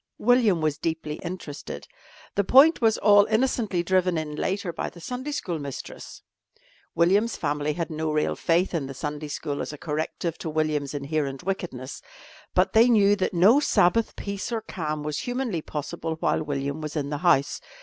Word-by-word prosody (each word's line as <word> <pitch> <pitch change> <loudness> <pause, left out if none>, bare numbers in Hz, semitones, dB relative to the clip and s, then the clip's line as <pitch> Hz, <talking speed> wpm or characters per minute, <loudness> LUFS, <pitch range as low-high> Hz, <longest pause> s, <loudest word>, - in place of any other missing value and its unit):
William 225 -7 +3
was 155 -2 0
deeply 160 -2 -3
interested. 170 -5 -7 0.5
The 200 - +1
point 275 - +6
was 225 -2 +3
all 205 -1 +6
innocently 220 -5 0
driven 180 -1 +2
in 155 -1 -3
later 190 +2 -2
by - - -3
the 175 - -14
Sunday 250 - -5
school 175 - -3
mistress. 140 -2 -8 0.7
William's 200 +7 +3
family 150 0 -1
had 170 +1 -3
no 155 0 -2
real 150 0 0
faith 175 +3 +1
in 155 -6 -1
the 135 - -8
Sunday 150 +2 -4
school 145 0 -4
as - - -4
a 150 - -8
corrective 160 +2 -3
to 165 - -4
William's 150 -2 -1
inherent 140 -1 -2
wickedness, 170 -10 -4 0.5
but - - +3
they 230 +3 +6
knew 205 -3 +5
that 190 -2 -2
no 205 +11 +6
Sabbath 230 -5 +2
peace 200 +4 -5
or 230 -1 -1
calm 155 -7 -4
was 150 -1 -2
humanly 245 -8 -2
possible 155 +2 -4
while 160 - 0
William 140 0 -3
was 155 0 -5
in 145 -1 -2
the 145 - -2
house. 145 -5 +2
165 Hz, 175 wpm, -25 LUFS, 150-200 Hz, 0.7 s, point